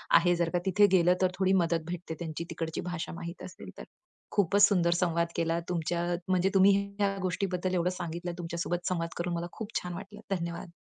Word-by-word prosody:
आहे. 175 +1 +5
जर 170 -1 +1
का 175 - +3
तिथे 200 +2 +5
गेलं, 180 -1 +5
तर 185 - +3
थोडी 190 0 +3
मदत 165 -1 0
भेटते 175 -1 -5
त्यांची 165 -1 -4
तिकडची 165 -1 -3
भाषा 175 -2 -4
माहीत 170 +1 -7
असेल 185 - -9
तर. - - -7 0.5
खूपच 200 +1 +5
सुंदर 175 -4 +2
संवाद 170 -1 +1
केला 165 0 +1
तुमच्या 170 0 -1 0.2
म्हणजे 185 0 +2
तुम्ही 195 0 +6 0.2
ह्या 200 -1 +2
गोष्टीबद्दल 185 0 -1
एवढं 180 0 +2
सांगितलं, 175 -1 -4
तुमच्या 170 -1 -5
सोबत 175 +1 -2
संवाद 165 -2 -1
करून 175 0 -2
मला 170 0 -2
खूप 220 0 -7
छान 180 0 -5
वाटलं. 205 +4 -9
धन्यवाद. 170 0 -5
175 Hz, 195 wpm, -30 LUFS, 170-185 Hz, 0.5 s, तुम्ही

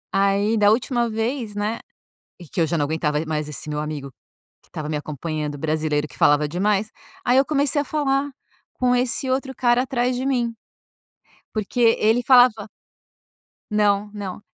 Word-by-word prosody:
Aí, 200 +3 +2
da 205 -1 +5
última 235 +1 +1
vez, 225 0 -3
né 210 +3 -2 0.6
e 175 - -11
que - - -9
eu - - +2
já 165 +1 -1
não 145 - +1
aguentava 150 -1 -1
e 160 - -5
mais 150 -1 -3
esse 150 - -5
meu 150 0 -3
amigo, 150 -2 -5 0.5
que - - -28
estava 150 -1 -5
me 155 - -2
acompanhando 150 0 -4
o - - -12
brasileiro, 155 0 -1
que - - -16
falava 145 0 +3
demais. 200 +5 0 0.3
Aí 245 - +3
eu 270 - +5
comecei 290 0 +1
a - - -8
falar 285 -1 0 0.4
com 250 -1 +1
esse 250 +1 0
outro 265 +1 -1
cara 240 0 +2
atrás 250 -1 -1
de 255 - -3
mim. 245 -4 0 1.0
Porque 215 +3 -3 0.2
ele 225 +3 +3
falava 245 -4 +5 1.0
Não, 205 -1 +2
não. 200 -2 -6
210 Hz, 175 wpm, -22 LUFS, 155-245 Hz, 1.0 s, da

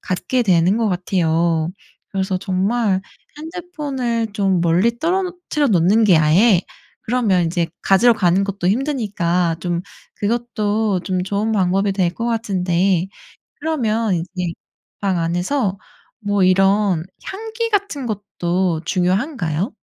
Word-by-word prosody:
갖게 240 +7 -1
되는 185 -1 +3
것 225 - +1
같아요. 170 -3 0 0.4
그래서 190 -1 -1
정말 195 +2 0 0.4
핸드폰을 290 -9 -3
좀 195 -3 +1
멀리 190 +8 +2
떨어뜨려 355 -3 -1
놓는 200 +4 +4
게 185 -5 +5
아예 175 +6 +4 0.4
그러면 215 -7 +1
이제 170 0 0 0.2
가지러 230 +5 +5
가는 185 -1 +2
것도 195 -2 -3
힘드니까 195 - 0
좀 175 -1 -1 0.4
그것도 215 -3 0
좀 185 0 -2
좋은 205 +3 -1
방법이 195 0 +1
될 185 -3 +1
거 230 - -4
같은데 190 -5 +1 0.5
그러면 230 -9 0
이제 180 +1 -3 0.5
방 195 -3 0
안에서 185 +6 -1 0.4
뭐 205 -3 0
이런 195 -2 +3 0.2
향기 445 +3 -4
같은 400 - -1
것도 185 -5 -1
중요한가요? 185 - -1
195 Hz, 250 characters per minute, -19 LUFS, 180-235 Hz, 0.5 s, 게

